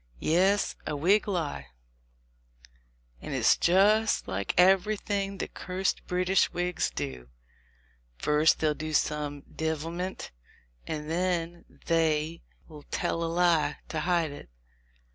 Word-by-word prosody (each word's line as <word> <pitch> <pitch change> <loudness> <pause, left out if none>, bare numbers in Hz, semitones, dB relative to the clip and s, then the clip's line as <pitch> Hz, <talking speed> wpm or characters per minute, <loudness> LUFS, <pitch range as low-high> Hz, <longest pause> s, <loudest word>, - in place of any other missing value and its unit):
"Yes, 190 - +2
a - - -2
Whig 190 +10 +3
lie; 160 - -3 1.5
and - - -5
it's - - +4
just 210 +5 +3
like 95 +1 -3
everything 195 +2 +2
the - - -3
cursed 185 +1 -3
British 180 +1 +2
Whigs 175 0 -1
do. 65 -4 -6 0.9
First 150 - +3
they'll 155 -1 +1
do 155 +1 -5
some 150 -1 -1
divilment, 165 +4 -4 0.6
and 150 -1 -4
then 175 0 -2 0.2
they'll 160 -1 -2
tell 165 - -1
a 165 - -1
lie 170 -4 +2
to 160 - -2
hide 170 -1 +1
it. 140 - -11
165 Hz, 110 wpm, -28 LUFS, 150-185 Hz, 1.5 s, it's